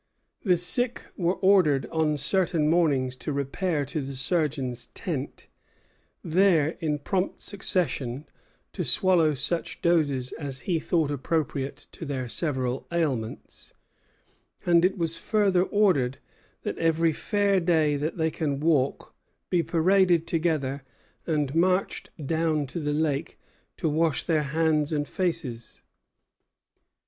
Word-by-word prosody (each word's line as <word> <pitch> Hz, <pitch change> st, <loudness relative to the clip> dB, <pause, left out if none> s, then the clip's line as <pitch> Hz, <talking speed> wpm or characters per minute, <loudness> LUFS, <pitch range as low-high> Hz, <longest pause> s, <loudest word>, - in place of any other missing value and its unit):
The 180 Hz, -4 st, +3 dB
sick 240 Hz, +8 st, +3 dB
were 175 Hz, 0 st, 0 dB
ordered 180 Hz, -8 st, +3 dB
on 155 Hz, -2 st, +1 dB
certain 165 Hz, +1 st, +1 dB
mornings 145 Hz, -6 st, +2 dB
to 150 Hz, -, -4 dB
repair 145 Hz, +3 st, -1 dB
to 150 Hz, +3 st, -3 dB
the 135 Hz, 0 st, -6 dB
surgeon's 135 Hz, -4 st, -1 dB
tent, -, -, -5 dB, 0.8 s
there, 170 Hz, -3 st, +3 dB
in 150 Hz, -2 st, -1 dB
prompt 185 Hz, +6 st, -2 dB
succession, 155 Hz, -, -1 dB, 0.5 s
to -, -, -3 dB
swallow 175 Hz, -6 st, +3 dB
such 170 Hz, +5 st, 0 dB
doses 145 Hz, -7 st, +1 dB
as 135 Hz, -4 st, -6 dB
he 175 Hz, -4 st, -1 dB
thought 155 Hz, -3 st, 0 dB
appropriate 140 Hz, -1 st, -2 dB
to -, -, -10 dB
their 135 Hz, -4 st, -3 dB
several 130 Hz, -2 st, -2 dB
ailments; 140 Hz, -10 st, -3 dB, 0.9 s
and 170 Hz, -1 st, +4 dB
it 190 Hz, +2 st, +2 dB
was 165 Hz, -2 st, -1 dB
further 200 Hz, -4 st, +2 dB
ordered 180 Hz, -11 st, +2 dB, 0.5 s
that -, -, -4 dB
"every 165 Hz, 0 st, +2 dB
fair 200 Hz, +2 st, +1 dB
day 160 Hz, -4 st, +2 dB
they 145 Hz, +2 st, -1 dB
that 160 Hz, -2 st, -2 dB
can 145 Hz, -3 st, -2 dB
walk 145 Hz, -4 st, 0 dB, 0.4 s
be 175 Hz, -, +3 dB
paraded 175 Hz, 0 st, +3 dB
together 155 Hz, -5 st, -1 dB, 0.5 s
and 150 Hz, -4 st, 0 dB
marched 185 Hz, +3 st, +1 dB, 0.2 s
down 160 Hz, -1 st, 0 dB
to 135 Hz, +6 st, -5 dB
the 150 Hz, -2 st, -2 dB
lake 150 Hz, 0 st, -1 dB, 0.4 s
to -, -, -1 dB
wash 160 Hz, 0 st, +1 dB
their 160 Hz, -3 st, +1 dB
hands 155 Hz, +1 st, 0 dB
and 145 Hz, -2 st, -1 dB
faces." 155 Hz, -11 st, -4 dB
160 Hz, 125 wpm, -26 LUFS, 140-175 Hz, 0.9 s, and